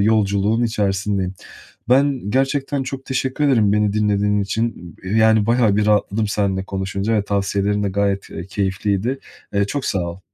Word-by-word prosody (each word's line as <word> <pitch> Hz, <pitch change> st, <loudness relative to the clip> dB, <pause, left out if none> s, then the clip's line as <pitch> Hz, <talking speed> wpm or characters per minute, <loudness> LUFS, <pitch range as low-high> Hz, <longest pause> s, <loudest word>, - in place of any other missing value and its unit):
yolculuğun 105 Hz, +1 st, +2 dB
içerisindeyim. 100 Hz, -3 st, -1 dB, 0.5 s
Ben 130 Hz, -4 st, +2 dB
gerçekten 135 Hz, +2 st, 0 dB
çok 135 Hz, 0 st, -6 dB
teşekkür 130 Hz, +2 st, -1 dB
ederim 115 Hz, -8 st, +3 dB
beni 105 Hz, -1 st, +2 dB
dinlediğin 105 Hz, -1 st, +1 dB
için. 100 Hz, -4 st, -3 dB
Y 95 Hz, -, -5 dB
yani 110 Hz, -1 st, +4 dB
bayağı 115 Hz, -3 st, +3 dB
bir 105 Hz, 0 st, +1 dB
rahatladım 105 Hz, 0 st, +1 dB
seninle 100 Hz, -2 st, -1 dB
konuşunca 95 Hz, +3 st, -3 dB
ve 105 Hz, -2 st, +1 dB
tavsiyelerin 100 Hz, 0 st, 0 dB
de 100 Hz, -, 0 dB
gayet, 100 Hz, 0 st, -1 dB
e, 85 Hz, -, -7 dB
keyifliydi. 100 Hz, +5 st, -1 dB, 0.3 s
E, 100 Hz, 0 st, +2 dB
çok 135 Hz, +7 st, -3 dB
sağ 100 Hz, -, 0 dB
ol. 85 Hz, +1 st, -5 dB
105 Hz, 155 wpm, -20 LUFS, 100-115 Hz, 0.5 s, yani